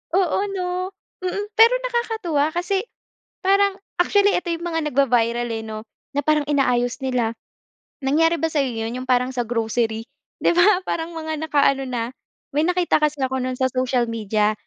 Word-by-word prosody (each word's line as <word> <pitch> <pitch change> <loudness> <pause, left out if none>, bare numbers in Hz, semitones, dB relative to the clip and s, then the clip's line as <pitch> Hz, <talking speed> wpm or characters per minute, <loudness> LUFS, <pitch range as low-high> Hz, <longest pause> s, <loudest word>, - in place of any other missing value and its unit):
Oo, 370 -3 +2 0.2
'no? 365 0 -2 0.4
Mm. 370 +3 -1
Pero 460 +2 +8
nakakatuwa 445 -11 0
kasi, 380 +4 0 0.6
parang 395 0 +3 0.2
actually 405 +2 +3
eto 355 - -1
'yong 335 0 -3
mga 325 -1 -1
nagva-viral 240 -3 +2
eh, 225 -1 -3
'no? 220 0 -7 0.3
Na - - +3
parang 305 -1 +3
inaayos 250 -4 +1
nila. 245 -4 -1 0.7
Nangyari 325 +5 +3
ba 325 0 -1
sa 305 - +1
'yo 245 -5 -1
'yon? 225 - -3
'Yong 255 - -7
parang 250 0 +2
sa 245 -3 -2
grocery, 225 -1 -1 0.4
'di - - +5
ba? 360 +2 +4
Parang 330 -1 -3
mga 315 -1 -4
nakaano 275 -3 +2
na 240 -1 -3 0.4
may 300 +3 +1
nakita 360 -3 +2
kasi 300 0 +1
ako 260 0 -1
no'n 255 0 -2
sa 260 0 +1
social 255 -1 +1
media. 215 -1 +1
285 Hz, 170 wpm, -22 LUFS, 245-350 Hz, 0.7 s, Pero